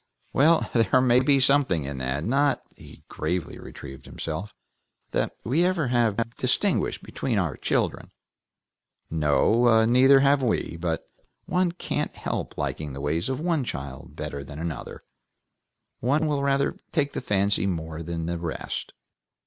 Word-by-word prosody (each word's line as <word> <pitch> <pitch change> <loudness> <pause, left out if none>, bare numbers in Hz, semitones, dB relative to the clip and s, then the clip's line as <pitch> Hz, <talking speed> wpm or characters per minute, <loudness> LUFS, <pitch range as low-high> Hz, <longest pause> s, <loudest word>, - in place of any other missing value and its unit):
"Well, 160 +4 +4
there 115 +1 +4
may 125 -1 +5
be 135 +1 +4
something 130 - +3
in 70 -1 -5
that. 65 +3 -2
Not," 140 +5 +2
he - - -15
gravely 90 -2 -3
retrieved 65 -1 -10
himself, 80 +6 -5 0.6
"that - - -1
we 130 +8 +1
have 180 +1 +3
ever 120 -6 +2
distinguished - - +1
between - - -2
our - - 0
children." - - -1 1.0
"No, 110 +10 +4
neither 130 +3 +6
have 140 0 +4
we. 115 -8 0
But 85 -1 -2 0.4
one 180 -1 +1
can't 175 - -3
help - - -4
liking 75 -3 -3
the 70 - -6
ways 80 - -1
of 130 - -2
one 165 -3 0
child 70 - -6
better 70 0 -5
than 70 +1 -9
another; 80 -3 -5 1.0
one 145 +7 +2
will 145 -2 0
rather 140 0 +1
take 145 -3 0
the - - -3
fancy 100 -3 +1
more 80 -3 -3
than 85 0 -4
the 85 0 -2
rest." 85 -2 -4
110 Hz, 145 wpm, -26 LUFS, -, 1.0 s, neither